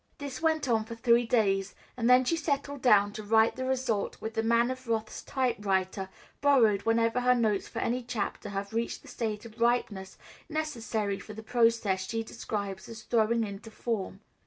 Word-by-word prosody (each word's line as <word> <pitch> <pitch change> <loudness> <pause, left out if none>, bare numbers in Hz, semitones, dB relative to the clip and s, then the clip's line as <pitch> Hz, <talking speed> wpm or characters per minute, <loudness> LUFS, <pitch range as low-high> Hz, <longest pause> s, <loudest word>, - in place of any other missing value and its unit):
This 280 -1 -6
went 315 -3 +1
on 225 -3 +2
for 230 +1 -8
three 235 0 +3
days, 195 -4 +1 0.2
and 240 -1 0
then 250 +1 +6
she 335 - +2
settled 285 -3 -2
down 205 -4 +5
to 215 - -6
write 220 +2 +3
the 260 - -3
result 255 -5 -1
with 220 - -5
the 225 - 0
Man 235 +2 +3
of 255 -1 -7
Wrath's 220 -1 -2
typewriter, 195 -7 -1 0.3
borrowed 235 -8 +4
whenever 230 +1 +2
her 250 0 +4
notes 215 -5 +1
for - - -10
any 245 +2 0
chapter 225 -3 -4
have 200 +1 -4
reached 230 +1 -2
the - - -15
state 215 -2 -4
of 230 0 -12
ripeness 215 -5 0 0.3
necessary 225 -10 -2
for 215 - -9
the 220 - -8
process 230 -5 +2
she 225 0 -1
describes 200 -3 -5
as 225 -1 -9
"throwing 230 0 +2
into 200 +1 -7
form." 215 -3 -4
230 Hz, 180 wpm, -29 LUFS, 210-245 Hz, 0.3 s, then